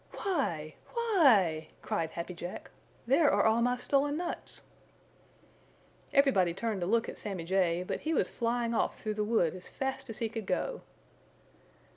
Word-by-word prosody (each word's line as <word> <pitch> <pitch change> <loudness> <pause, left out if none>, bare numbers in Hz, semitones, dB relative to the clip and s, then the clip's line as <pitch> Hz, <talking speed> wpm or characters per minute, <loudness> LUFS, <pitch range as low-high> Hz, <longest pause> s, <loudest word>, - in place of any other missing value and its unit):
"Why! 170 - -2 0.2
Why 300 - +5
e - - -4
e!" 155 - -14 0.2
cried 165 -1 -1
Happy 170 +2 -5
Jack. 175 +1 -7 0.3
"There 285 +5 +4
are 205 - +3
all 220 +1 +4
my 245 +1 +2
stolen 285 +3 +1
nuts!" 350 0 -4 1.5
Everybody 220 - +3
turned 215 -1 -2
to 175 - -1
look 230 +3 +2
at - - -6
Sammy 195 -5 -4
Jay, 180 -1 +1
but - - -3
he 315 - -2
was 320 - +1
flying 235 0 -1
off - - 0
through 215 - -2
the 210 0 -1
wood 210 -7 +2
as 185 -1 -9
fast 265 -1 -4
as 225 - -3
he 230 - 0
could 220 -3 -6
go. - - -1
225 Hz, 170 wpm, -31 LUFS, 180-275 Hz, 1.5 s, Why